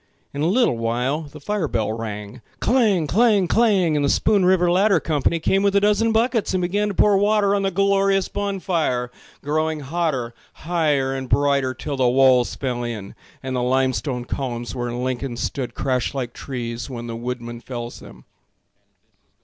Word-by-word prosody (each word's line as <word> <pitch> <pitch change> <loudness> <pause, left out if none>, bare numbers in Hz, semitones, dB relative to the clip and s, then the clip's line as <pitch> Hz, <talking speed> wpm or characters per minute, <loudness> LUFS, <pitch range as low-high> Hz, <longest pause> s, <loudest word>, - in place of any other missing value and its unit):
In 140 - -4
a 155 - +2
little 200 - +2
while 125 +6 -1
the 150 0 -11
fire 195 +2 -2
bell 110 -4 -1
rang— 105 -2 -6 0.2
Clang! 215 -10 +2
Clang! 205 - +3
Clang! 195 -6 +3
And 145 - +1
the 140 - +2
Spoon 200 +5 +2
River 180 -1 +3
ladder 195 0 +4
company 155 +1 0
Came 195 +4 +1
with 200 0 +2
a - - +6
dozen 210 +2 +2
buckets 225 -2 +1
and 185 - +1
began 205 +4 0
to 205 - -4
pour 200 0 +4
water 205 -1 +2
On 200 - +1
the 195 - +1
glorious 195 0 +2
bon 200 -1 -3
fire, 130 -10 -1 0.3
growing 155 +1 -1
hotter 140 -5 -2 0.2
Higher 150 -6 0
and 130 -1 -5
brighter, 140 -2 +2
till 140 +3 -5
the 130 -2 +3
walls 130 -1 +4
fell 125 -3 -3
in 110 -5 -6 0.3
And 130 0 -3
the 125 - 0
limestone 125 -1 0
columns 120 -3 -4
where 120 -1 -3
Lincoln 125 0 -3
stood 125 +2 -4
Crashed 130 0 -1
like 125 -3 -3
trees 120 -2 -5
when 120 -2 -6
the 115 -1 -5
woodman 120 0 -5
fells 120 -2 -7
them. 60 0 -14
145 Hz, 175 wpm, -22 LUFS, 125-195 Hz, 0.3 s, a